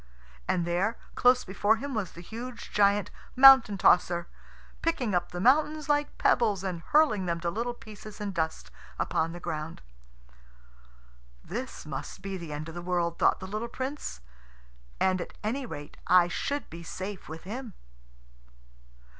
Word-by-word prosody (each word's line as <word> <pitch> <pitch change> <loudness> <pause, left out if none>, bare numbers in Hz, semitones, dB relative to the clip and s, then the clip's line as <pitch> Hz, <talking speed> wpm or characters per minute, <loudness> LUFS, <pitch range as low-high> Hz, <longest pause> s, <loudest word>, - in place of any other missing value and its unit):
And 175 - +1
there, 185 +7 0 0.2
close 250 0 +4
before 205 +3 +2
him, 275 +4 -5
was 210 -6 -3
the 170 - -10
huge 235 +5 -8
giant 200 -1 +3 0.2
Mountain 260 -6 +8
tosser, 175 -1 +3 0.5
picking 265 - 0
up 175 -1 0
the 175 - -5
mountains 300 +7 +3
like 290 0 +1
pebbles 210 -6 +2
and 180 -3 -3
hurling 220 - +3
them 170 -1 -1
to 170 0 -1
little 240 +5 -2
pieces 215 -2 -11
and 205 -2 -3
dust 160 - -3 0.3
upon 160 +1 0
the 175 - -7
ground. 160 - -5 1.6
"This 235 +5 -6
must 150 +5 -6
be 195 -1 -4
the 170 -4 -7
end 150 +1 -5
of 165 - -8
the 175 - -6
world," 175 -1 -1
thought - - +4
the 190 - -7
little 215 +5 -4
Prince; 260 - -5 0.8
"and 185 -1 +2
at - - -8
any 250 +5 -2
rate 145 -7 -8
I 180 -1 +6
should 285 +10 -3
be 165 +1 -8
safe 190 +2 -6
with 160 +1 -8
him." 225 +3 -6
195 Hz, 155 wpm, -28 LUFS, 170-240 Hz, 1.6 s, Mountain